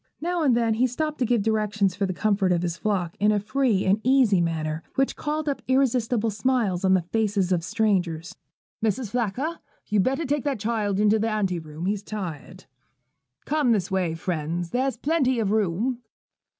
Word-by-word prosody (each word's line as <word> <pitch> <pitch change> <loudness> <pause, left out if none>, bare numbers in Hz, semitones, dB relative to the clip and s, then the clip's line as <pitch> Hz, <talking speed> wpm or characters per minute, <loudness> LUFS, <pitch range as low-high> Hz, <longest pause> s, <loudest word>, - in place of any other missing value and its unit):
Now 345 +2 -1
and 265 -6 +3
then 230 -2 +2
he 245 +4 +2
stopped 305 +4 -3
to 250 - +1
give 235 -3 +2
directions 210 -3 +1
for 200 0 0
the - - -2
comfort 200 0 +1
of 175 -1 +1
his 170 -1 -1
flock 180 -2 -2
in 210 +2 +4
a 210 - +2
free 220 -1 +1
and 195 +3 +2
easy 250 -8 +4
manner, 160 -2 -2
which 270 0 +1
called 305 0 -3
up 280 - -1
irresistible 245 -4 +1
smiles 210 -4 0
on 190 0 +4
the 185 - +1
faces 200 -1 0
of 175 -2 +1
strangers. 185 -6 -1 0.5
'Mrs. 220 0 -1
Flacker, 250 +8 -2 0.3
you'd 210 -2 +2
better 270 - 0
take 290 0 -1
that 280 -5 -1
child 210 -2 -1
into 210 +1 +4
the 225 +1 0
ante 195 -5 0
room: 155 +1 -7
he's 200 +1 -1
tired.' 185 -9 -7 0.8
'Come 290 -5 +2
this 195 -3 -1
way, 180 -4 0
friends: 165 0 -3
there's 260 +1 0
plenty 270 -2 +1
of 210 -3 0
room.' 220 +4 0
215 Hz, 185 wpm, -25 LUFS, 185-255 Hz, 0.8 s, in